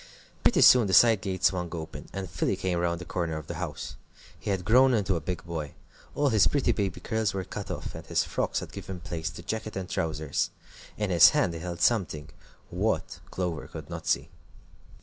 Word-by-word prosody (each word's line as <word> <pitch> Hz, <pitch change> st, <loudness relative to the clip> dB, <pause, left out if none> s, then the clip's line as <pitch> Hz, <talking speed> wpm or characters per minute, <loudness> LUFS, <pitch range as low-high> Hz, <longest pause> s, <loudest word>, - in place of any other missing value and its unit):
Pretty -, -, +3 dB
soon 125 Hz, -4 st, +8 dB
the 95 Hz, -, +3 dB
side 115 Hz, -4 st, +6 dB
gate 95 Hz, -2 st, -4 dB
swung 90 Hz, -2 st, +2 dB
open, 80 Hz, -2 st, -7 dB
and 95 Hz, -1 st, -5 dB
Philly 90 Hz, +2 st, -1 dB
came 90 Hz, -2 st, -1 dB
round 85 Hz, -1 st, 0 dB
the 90 Hz, -, -8 dB
corner 85 Hz, -2 st, -2 dB
of 80 Hz, -, -7 dB
the 85 Hz, -, -5 dB
house. 80 Hz, -6 st, -5 dB, 0.4 s
He -, -, -5 dB
had 95 Hz, -3 st, -1 dB
grown 125 Hz, +4 st, +5 dB
into 100 Hz, -4 st, +1 dB
a 85 Hz, -, -2 dB
big 85 Hz, +2 st, -4 dB
boy. 80 Hz, -4 st, -5 dB, 0.4 s
All 145 Hz, -1 st, +2 dB
his 110 Hz, -5 st, +5 dB
pretty 140 Hz, -4 st, +1 dB
baby 100 Hz, -5 st, -1 dB
curls 110 Hz, -4 st, -1 dB
were 95 Hz, -, -2 dB
cut 100 Hz, +3 st, -7 dB
off, -, -, -5 dB
and -, -, -8 dB
his -, -, +2 dB
frocks -, -, -1 dB
had -, -, -8 dB
given 95 Hz, -1 st, -7 dB
place 85 Hz, -1 st, -4 dB
to 85 Hz, -, -10 dB
jacket 110 Hz, +3 st, -4 dB
and 95 Hz, -1 st, -4 dB
trousers. 80 Hz, -4 st, -1 dB, 0.5 s
In 105 Hz, -2 st, -1 dB
his 85 Hz, -2 st, +9 dB
hand 85 Hz, -, +2 dB
he 85 Hz, -, -5 dB
held 85 Hz, 0 st, -5 dB
something. 85 Hz, -10 st, +1 dB, 0.4 s
What, -, -, -1 dB
Clover 90 Hz, -3 st, -3 dB
could -, -, -9 dB
not -, -, -6 dB
see. -, -, +1 dB
90 Hz, 210 wpm, -28 LUFS, 85-105 Hz, 0.5 s, his